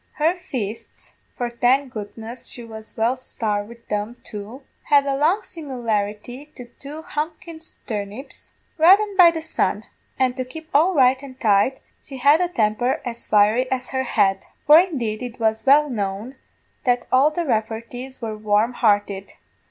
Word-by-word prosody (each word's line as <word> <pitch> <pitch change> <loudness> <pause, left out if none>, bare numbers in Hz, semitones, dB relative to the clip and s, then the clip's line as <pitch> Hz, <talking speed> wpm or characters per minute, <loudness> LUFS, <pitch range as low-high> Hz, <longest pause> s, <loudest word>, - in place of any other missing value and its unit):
Her 315 +3 +2
fists 250 - -7 0.2
for, 240 -1 -2
thank 250 +3 +1
goodness, 225 +3 -8
she 240 - -9
was 220 -1 -11
well 230 +3 +2
sarved 210 -5 -3
wid 235 0 -15
them 210 +3 -3
too 215 +6 -9 0.2
had 285 -1 +4
a 275 - 0
strong 320 +9 +2
simularity 245 - -4
to 250 - -9
two 290 +6 -10
thumpin' 315 +2 -4 0.3
turnips, 210 +4 -7 0.3
reddened 395 +5 +5
by 360 -3 +8
the 325 -1 -4
sun; 210 -9 -1 0.3
an' 255 -1 +2
to 255 - -3
keep 315 +5 -11
all 340 +6 +4
right 260 -1 +4
and 265 -2 -11
tight, 215 +4 +2 0.2
she 270 - -10
had 285 +6 +4
a 355 - +2
temper 235 -4 0
as 235 -1 -6
fiery 215 +5 +3
as 255 -1 -3
her 260 -1 0
head 195 -5 +2 0.3
for, 300 +2 +9
indeed, 255 - -1
it 245 -1 -7
was 220 +2 0
well 295 +2 +6
known 210 +1 -4 0.5
that 245 -2 +1
all 265 +4 +5
the 335 +2 -3
Rafferties 235 +2 -3
were 220 -1 -3
warm 215 +2 +1
hearted. 205 -4 0
250 Hz, 160 wpm, -22 LUFS, 220-285 Hz, 0.5 s, for